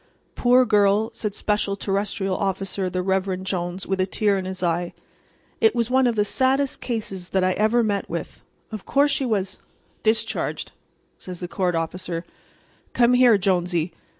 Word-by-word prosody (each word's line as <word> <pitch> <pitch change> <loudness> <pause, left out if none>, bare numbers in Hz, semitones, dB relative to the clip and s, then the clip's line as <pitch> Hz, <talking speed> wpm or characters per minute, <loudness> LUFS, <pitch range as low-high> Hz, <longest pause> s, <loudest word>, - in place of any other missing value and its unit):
"Poor 250 +1 +4
girl," 210 0 +3
said 210 -2 -4
Special 205 -1 0
Terrestrial 195 -1 -2
Officer 195 -1 -2
the 180 0 -2
Reverend 190 0 -1
Jones, 180 0 -3
with 190 -1 -1
a 185 - +1
tear 205 +1 +1
in 190 -1 -3
his 185 0 -5
eye. 175 0 -1 0.7
"It 225 +2 +4
was 235 0 0
one 260 0 +4
of 235 - 0
the 210 -1 +2
saddest 265 +4 +1
cases 205 -7 -4
that 190 -1 +1
I 185 - +3
ever 220 +5 +2
met 205 -2 -1
with. - - -6 0.3
Of 215 -3 -6
course 285 +1 +2
she 270 -2 0
was"— 195 -4 -1 0.4
"Discharged," 225 +1 -1 0.5
said 185 - -8
the 175 0 -6
court 180 -1 -1
officer. 170 +1 -3 0.7
"Come 240 0 +4
here, 245 -3 +6
Jonesy. 180 -3 0
195 Hz, 165 wpm, -23 LUFS, 185-225 Hz, 0.7 s, here